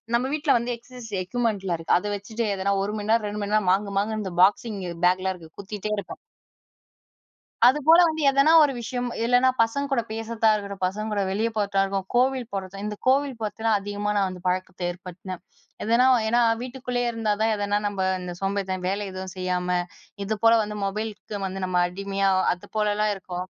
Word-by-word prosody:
நம்ப 240 +2 +1
வீட்டில 300 -3 +2
வந்து 240 +1 -2
எக்சர்சைஸ் 235 -2 -12
எக்யூப்மென்ட்டிலா 200 -4 -1
இருக்கு, 165 +1 +2
அத 210 - -5
வச்சுட்டு 220 +3 -4
எதனா 195 +1 0
1 205 - -2
மணி 210 +1 -5
நேரம் 225 -2 +2
2 210 0 -4
மணி 205 +1 -3
நேரம், 200 -4 +2
மாங்கு 200 +1 0
மாங்குன்னு 215 +1 -2
இந்த 190 -2 -5
பாக்ஸிங் 210 +1 +2 0.3
பேக்லாம் 185 +1 +1
இருக்கு, 160 -2 -15
குத்திட்டே 210 +1 -5
இருப்பேன். 200 - -6 1.5
அதுபோல 300 +5 +6
வந்து 315 -1 -2
எதனா 275 +3 +4
ஒரு 290 - +2
விஷயம், 245 +1 -3 0.2
இல்லைனா 245 +2 +4
பசங்க 280 +5 0
கூட 250 - +2
பேசுறதா 225 0 0
இருக்கட்டும், 200 -2 -4
பசங்க 210 +4 -3
கூட 205 - 0
வெளியே 220 +4 0
போறதா 200 -1 +1
இருக்கும், 195 -1 -3
கோவில் 255 -1 +2
போறது 195 0 -5
இந்த 210 0 -3
கோவில் 270 -1 +2
போறத்துலாம், 220 0 0
அதிகமா 205 +1 -3
நான் 195 - +2
வந்து 180 -1 -9
பழக்கத்தை 185 0 -2
ஏற்படுத்துனேன். 180 0 -9 0.4
எதனா 235 +4 +4 0.2
ஏன்னா 240 +2 +3 0.2
வீட்டுக்குள்ளேயே 250 -1 -3
இருந்தா 225 -2 0
தான், 220 0 +3
எதனா 205 0 0
நம்ப 200 -2 -3 0.2
இந்த 180 -1 -5
சோம்பேறித்தன 195 -2 -2
வேலை 200 +1 -2
எதுவும் 185 0 -6
செய்யாம, 180 0 0 0.5
இது 220 +2 -1
போல 230 0 +7
வந்து 210 0 -5
மொபைலுக்கு 210 0 -4
வந்து 190 0 -5
நம்ம 180 -1 +1
அடிமையா, 195 +1 -1 0.2
அது 180 - -12
போலலாம் 210 0 +1
இருக்கும், 180 -1 -6
210 Hz, 180 wpm, -25 LUFS, 190-230 Hz, 1.5 s, போல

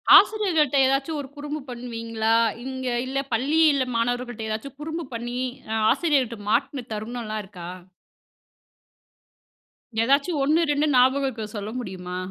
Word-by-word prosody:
ஆசிரியர்கள்ட்ட 330 -10 +4
எதாச்சும் 275 +4 +1
ஒரு 270 - -9
குறும்பு 295 +1 -4
பண்ணுவீங்களா? 230 -2 -1 0.3
இங்க 260 -1 -4 0.2
இல்ல 270 +1 -1
பள்ளியில 285 +2 +3
மாணவர்கள்ட்ட 240 -1 -1
எதாச்சும் 225 +6 -5
குறும்பு 320 +2 -4
பண்ணி 240 +2 -4 0.3
அ - - 0 0.2
ஆசிரியர்ட்ட 265 -9 +1
மாட்டுன 265 +2 0
தருணம்லாம் 215 0 -4
இருக்கா? 180 -3 -9 2.3
எதாச்சும் 280 +5 +2
1, 310 +4 +3
2 290 +1 +2
ஞாபகம் 260 +2 +4
இருக்க 225 -4 -5
சொல்ல 205 0 -4
முடியுமா? 185 -5 -6
255 Hz, 115 wpm, -24 LUFS, 230-285 Hz, 2.3 s, ஆசிரியர்கள்ட்ட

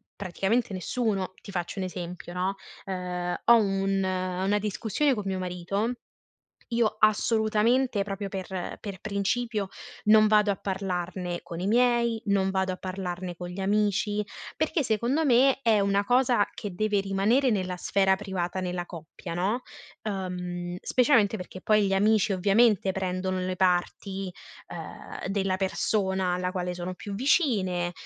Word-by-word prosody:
praticamente 200 +4 -1
nessuno. 195 0 -1
Ti 200 - -10
faccio 180 +1 -3
un 190 - -1
esempio, 180 -1 -6
no, 185 +2 -1 0.3
ehm, 180 -2 -3
ho 235 - +8
un 195 -2 +1
una 185 +2 0
discussione 215 +7 0
con 210 -4 -3
mio 190 -1 -2
marito, 185 +5 -2 0.8
io 230 -2 +1
assolutamente 220 +2 +3
proprio 200 0 -4
per 190 -1 -5
per 200 -3 -7
principio 210 +1 -1 0.4
non 215 0 +7
vado 210 -1 +4
a 200 - +2
parlarne 180 -2 -3
con 170 - -7
i 185 - -2
miei, 235 0 +3
non 195 -1 +2
vado 190 0 0
a 185 - -4
parlarne 185 -1 -5
con 175 +1 -6
gli 180 +2 -7
amici, 205 +1 +1 0.3
perché 330 - +1
secondo 240 +7 +1
me 265 -1 +4
è 225 -4 +4
una 200 0 +2
cosa 245 -1 +3
che 205 -3 -6
deve 210 +2 +1
rimanere 200 +7 +2
nella 185 -3 -1
sfera 190 +1 +2
privata 190 -2 -3
nella 180 -1 -3
coppia, 165 +1 -8
no, 200 +8 0 0.4
uhm, 180 -3 -4
specialmente 235 -5 +3
perché 185 0 -9
poi 215 -1 +3
gli 195 - +1
amici 210 +1 +3
ovviamente 200 +1 +3
prendono 185 0 -2
le 185 0 -2
parti, 190 +1 0 0.4
uhm, - - -7
della 195 -1 0
persona 190 -1 0
alla 180 0 -1
quale 180 -1 -2
sono 180 +1 -5
più 200 +2 -7
vicine, 200 - +1
195 Hz, 145 wpm, -27 LUFS, 185-215 Hz, 0.8 s, ho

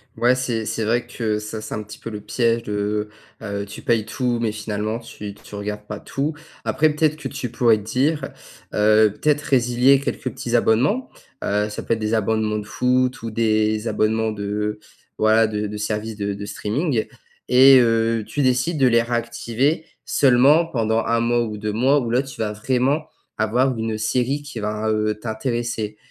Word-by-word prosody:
Ouais, 120 +1 +3
c'est 125 -3 -2
c'est 110 +1 -2
vrai 120 +3 +1
que 115 -3 -2
ça 110 +1 -6
c'est 110 - -5
un 105 - -4
petit 105 +1 -11
peu - - -7
le 105 -2 -6
piège 115 +1 0
de, 105 0 -2 0.3
heu, 100 -1 -3
tu 100 - -10
payes 115 -2 +2
tout, 120 +2 -1
mais 115 -2 0
finalement 105 +1 -3
tu 105 -3 -9
tu 105 - -17
regardes 105 +1 -5
pas 105 0 -6
tout. 140 +3 -3 0.3
Après, 155 0 +3
peut-être 150 0 +1
que 155 - -5
tu 130 -4 -5
pourrais 115 -2 +4
te 105 - -8
dire 135 +8 0 0.5
heu, 105 0 +4
peut-être 150 -1 +2
résilier 125 0 +3
quelques 140 - -4
petits 120 0 -3
abonnements, 130 - +2 0.3
heu, 105 +1 0
ça 105 - -6
peut - - 0
être 115 - -2
des 110 +1 0
abonnements 110 0 0
de 105 - -5
foot 125 +3 +1
ou 115 - -4
des 110 0 +1
abonnements 110 0 +1
de, 105 0 -3 0.4
voilà, 110 +1 +5
de 105 -1 -2
de 105 +1 -6
services 105 +1 -3
de 100 -1 -2
de 100 +1 -6
streaming, 120 +3 -1 0.4
et 130 +2 +8
heu, 115 -1 +2
tu 145 - -3
décides 130 +5 +1
de 135 - +5
les 115 -1 +4
réactiver 120 +5 -1 0.2
seulement 140 +5 +4
pendant 115 -7 0
1 115 0 +1
mois 120 +1 +2
ou 110 -2 -5
2 105 0 -3
mois, 130 +6 +3
où 120 -4 -3
là, 125 +3 +2
tu 135 -4 -8
vas 105 -1 -1
vraiment 130 +7 0 0.3
avoir 125 +4 +1
une 110 -1 -2
série 125 +6 0
qui 140 -5 -8
va, 105 +1 -2
heu, 110 0 +1
t'intéresser, 115 -2 -3
115 Hz, 190 wpm, -22 LUFS, 105-125 Hz, 0.5 s, et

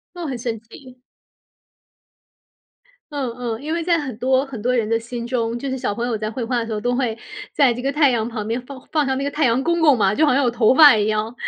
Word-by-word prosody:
哦， 350 -1 -6
很 260 -3 -4
神 230 -2 -4
奇。 250 +2 -16 2.1
嗯， 275 -4 -2
嗯， 235 -1 -4
因 310 +2 -3
为 335 - -2
在 340 -1 +2
很 265 -6 -5
多 260 +2 +2
很 265 -5 -8
多 250 +2 0
人 230 -3 0
的 230 0 +1
心 235 +1 -6
中， 240 -1 -2
就 275 - -4
是 265 - -3
小 225 - -2
朋 235 +3 -3
友 235 -3 -1
在 215 0 -4
绘 245 - -5
画 245 +1 -1
的 230 - -3
时 225 - -7
候 215 - -2
都 245 +3 -1
会 245 -4 -1 0.4
在 275 -5 +4
这 245 - -6
个 270 +2 -1
太 290 -1 +4
阳 230 -3 0
旁 215 -3 -5
边 230 +2 -1
放 265 0 -10
放 305 -2 +1
上 265 -1 -1
那 275 - -2
个 - - 0
太 300 +2 -2
阳 250 0 +2
公 340 +3 0
公 295 -6 +5
嘛， 200 -1 +2
就 315 - +3
好 290 - +3
像 275 - +3
有 245 - +3
头 235 0 +3
发 295 -3 +8
一 210 -1 +1
样， 215 +1 -1
250 Hz, 290 characters per minute, -21 LUFS, 230-275 Hz, 2.1 s, 发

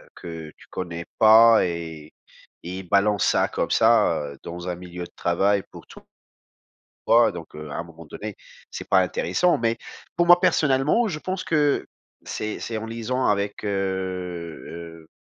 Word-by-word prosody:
que 80 -2 -8
tu - - -18
connais 85 -2 -5
pas 110 0 +7
et 80 -3 -6 0.5
et 90 +2 -5
il - - -7
balance 100 +1 +3
ça - - +3
comme - - -2
ça, 110 -8 +4
heu, - - -15
dans 90 +1 -6
un 90 - -2
milieu 90 0 -8
de - - -10
travail 95 +3 +1
pour - - -12
tou - - -13 1.1
toi 115 -1 +5
donc, 85 -3 -8
heu, 75 -1 -8
à - - -5
un 85 - -3
moment 85 -1 -13
donné, 105 +6 -7 0.4
c'est - - -7
pas 95 - +5
intéressant 95 - +1
mais 115 0 0 0.4
pour 175 0 +2
moi 175 0 +8
personnellement, 150 - +2
je 155 -7 -4
pense 185 +2 -4
que 150 -3 +1 0.4
c'est 105 0 -4
c'est 115 -1 -4
en 110 - -5
liaison 115 +3 -2
avec, 100 0 0
heu, 90 -4 -4
95 Hz, 165 wpm, -24 LUFS, 85-115 Hz, 1.1 s, moi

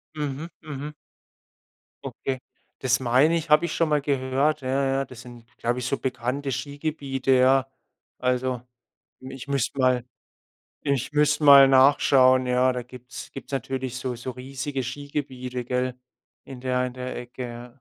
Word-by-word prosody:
Mhm. 150 +2 -4
Mhm. 150 0 -6 1.1
Okay. 130 -1 -4 0.4
Das 130 -1 +2
meine 130 +7 +3
ich, 160 -2 -3
habe 150 +3 +5
ich 160 - -3
schon 165 -2 +1
mal 150 -1 +2
gehört. 140 +2 0
Ja, 130 - -4 0.2
ja, 135 0 0
das 125 -1 -12
sind, 120 -2 -13
glaube 120 +1 -1
ich, 125 - -4
so 140 - 0
bekannte 130 +2 -2
Skigebiete, 140 0 -2
ja. 130 +1 +4 0.5
Also, 125 -1 0 0.6
ich 130 +1 -9
müsst 140 -1 -1
mal 130 -2 +3 0.8
ich 140 -2 -1
müsste 150 0 +2
mal 140 -1 +9
nachschauen. 130 -1 +5
Ja, 125 +1 +3
da 125 - -3
gibt's 125 -1 -10
gibt's 135 - -10
natürlich 130 -1 -3
so 130 -1 -3
so 125 +2 -6
riesige 135 +2 -5
Skigebiete, 130 -2 -5
gell, 125 0 -1 0.5
in 130 -2 -10
der 125 -1 0
in 125 - -5
der 125 0 -5
Ecke. 120 0 -7
130 Hz, 150 wpm, -25 LUFS, 125-140 Hz, 1.1 s, mal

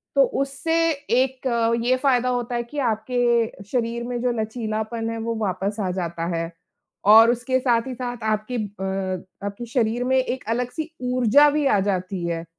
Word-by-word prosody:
तो - - +6 0.2
उससे 275 +4 -2 0.2
एक 265 -2 0 0.4
ये 255 +1 +4
फ़ायदा 255 -2 +3
होता 245 -1 -2
है 240 - -1
कि 260 +5 -6
आपके 235 -2 0
शरीर 235 -1 -1
में 245 0 -3
जो 250 0 +1
लचीलापन 220 0 -3
है, 230 - -4
वो 230 +1 -2
वापस 200 -1 -2
आ 190 - -1
जाता 170 -2 -3
है 165 0 -3 0.6
और 225 +1 +8
उसके 245 +2 0
साथ 240 -2 +1
ही 260 - -4
साथ 245 -2 -5
आपके 215 +2 -1
अ, 190 -3 -3 0.2
आपके 205 +4 -6
शरीर 240 -1 +1
में 260 +1 +2
एक 260 0 -1
अलग-सी 250 +7 -2 0.2
ऊर्जा 255 +4 +5
भी 295 0 0
आ 210 - +3
जाती 185 -1 -3
है 165 -1 -2
अ, - - -16
235 Hz, 175 wpm, -23 LUFS, 210-255 Hz, 0.6 s, और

